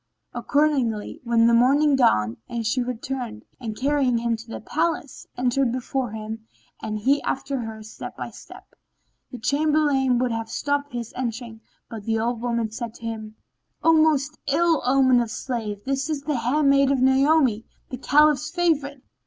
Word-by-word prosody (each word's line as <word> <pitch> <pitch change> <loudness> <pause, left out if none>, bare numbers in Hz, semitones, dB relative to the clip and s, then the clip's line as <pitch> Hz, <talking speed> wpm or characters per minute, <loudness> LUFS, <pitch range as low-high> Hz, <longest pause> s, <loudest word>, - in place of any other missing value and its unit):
Accordingly, 275 -8 0
when 235 -1 +3
the 235 - +4
morning 275 +5 +4
dawned, 110 - +2 0.3
she 225 +4 0
returned 245 -2 -5
and, 220 -4 -6
carrying 270 -3 +1
him 230 0 0
to 225 +1 -11
the - - -6
palace, 320 -4 -2
entered 250 0 +1
before 255 0 -2
him 220 +1 -7 0.3
and 215 0 -3
he 270 +7 +2
after 270 0 -2
her 220 -2 -6
step 215 - -9
by - - -6
step. - - -14 0.6
The 250 - -7
Chamberlain 285 0 +2
would 250 0 0
have 225 0 -3
stopped 285 -1 -2
his 235 -2 -5
entering, 235 -2 -5 0.3
but 220 -3 -8
the 225 0 0
old 230 +1 -1
woman 235 -2 -1
said 230 0 -6
to - - -15
him, 220 -1 -6 0.5
"O 330 - +5
most 305 -2 +2
ill 325 +2 +2
omened 260 -2 +4
of 235 - -3
slaves, 215 -4 -4
this 275 +2 -1
is 295 -3 -2
the 295 -2 -1
handmaid 275 +3 +3
of 275 - +1
Naomi, 265 -4 +3 0.2
the 255 - -4
Caliph's 300 +2 +3
favourite. 300 -6 0
255 Hz, 160 wpm, -24 LUFS, 230-285 Hz, 0.6 s, O